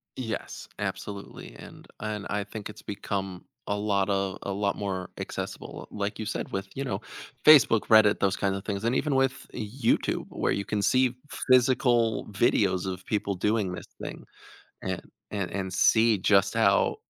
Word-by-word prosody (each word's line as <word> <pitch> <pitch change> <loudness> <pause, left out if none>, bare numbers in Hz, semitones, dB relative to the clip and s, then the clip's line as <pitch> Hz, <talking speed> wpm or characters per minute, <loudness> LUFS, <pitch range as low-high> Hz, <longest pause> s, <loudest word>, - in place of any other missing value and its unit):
Yes, 115 -5 -5
absolutely, 100 -11 -6
and - - -12
and 105 -1 -4
I 105 0 -1
think 105 0 -7
it's 105 - -11
become 95 -2 -4 0.2
a 100 - 0
lotta 100 -2 0
a 100 - -3
lot 100 0 0
more 95 -3 -3
accessible, - - -6
like 105 0 -3
you 110 - -4
said, - - -4
with, 95 0 -2
you 135 - -3
know, - - -3 0.4
Facebook, 140 -7 +8
Reddit, 110 -2 +6
those 95 -1 +2
kinds 100 -1 0
of 95 - -7
things, 100 0 -3
and 120 +2 +2
even 145 -1 +1
with 135 0 +1
YouTube, 115 +3 0
where - - -1
you 100 - -1
can 105 -1 -1
see 130 +3 +3 0.3
physical 125 -3 +4
videos 95 -3 +2
of 90 0 -8
people 100 -2 -1
doing 105 0 0
this 90 - -7 0.2
thing - - -6 0.6
and - - -3 0.3
and 100 -3 -3
and 95 -2 -3
see 110 +3 +4
just 100 +1 +3
how 100 -3 +3
105 Hz, 165 wpm, -27 LUFS, 100-115 Hz, 0.6 s, Facebook